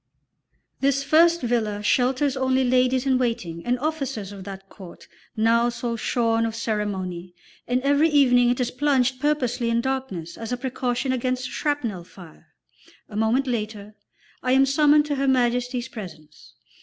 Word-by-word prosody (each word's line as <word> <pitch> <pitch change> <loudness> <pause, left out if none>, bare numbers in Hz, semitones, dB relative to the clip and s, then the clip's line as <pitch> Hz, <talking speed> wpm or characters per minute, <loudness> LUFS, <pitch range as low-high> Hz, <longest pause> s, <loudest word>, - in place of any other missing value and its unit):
This 275 0 +1
first 335 +4 +4
villa 220 -4 -1
shelters 260 +5 +1
only 260 0 +1
ladies 255 +1 +2
in 260 -2 +2
waiting 180 -9 -2
and 245 +1 0
officers 270 -8 -3
of 195 -2 -10
that 195 -1 -9
court 190 -3 -13 0.3
now 230 +2 +3
so 235 0 -3
shorn 230 0 0
of 225 -1 -2
ceremony, 190 -6 -3 0.3
and 250 +1 0
every 285 +3 +3
evening 250 -5 +4
it 245 - 0
is 250 -1 -1
plunged 260 -2 +1
purposely 250 -5 0
in 230 0 +1
darkness 235 -11 -4
as 225 +1 -6
a 250 - -1
precaution 250 0 -2
against 255 0 -2
shrapnel 245 - -2
fire. 175 -2 -15 0.6
A 205 - -10
moment 225 +5 +1
later 215 -4 -4 0.5
I 255 - +1
am 270 +1 +5
summoned 295 +2 +4
to 290 -2 -2
Her 275 0 0
Majesty's 245 -1 +1
presence. 165 -10 -11
245 Hz, 155 wpm, -24 LUFS, 220-265 Hz, 0.6 s, am